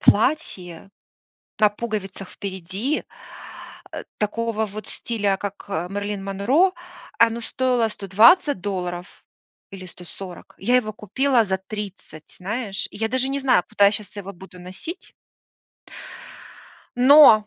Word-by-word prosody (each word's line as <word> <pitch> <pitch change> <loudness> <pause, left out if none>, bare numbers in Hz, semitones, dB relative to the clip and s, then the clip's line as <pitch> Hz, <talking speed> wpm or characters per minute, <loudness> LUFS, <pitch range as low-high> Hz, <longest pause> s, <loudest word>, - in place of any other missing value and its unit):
платье 200 - +1 0.7
на 210 -2 +6
пуговицах 205 -3 -5
впереди, 195 - -3 0.9
э, - - -6
такого 220 +1 -1
вот 215 +1 -8
стиля 205 -5 -1
как, 200 +1 -6
э, 175 -2 -2
Мэрилин 205 0 -3
Монро, 250 - +3 0.5
оно 230 0 +4
стоило 250 -1 +1
120 215 - +5
долларов 180 -2 -4 0.5
или 190 -2 -9
140, 180 +1 -10
я 245 +6 +3
его 215 -4 +1
купила 235 +4 +2
за 190 -2 -1
30, 190 -5 -8
знаешь. 200 +1 -3
Я 225 +1 -2
даже 260 +2 0
не 275 +1 -1
знаю, 255 -9 +4
куда 200 - +5
я 200 - +6
сейчас 210 -1 -5
его 200 -1 -6
буду 185 0 -13
носить. 190 - -8 1.8
Но! 250 -5 +8
205 Hz, 120 wpm, -23 LUFS, 190-235 Hz, 1.8 s, Но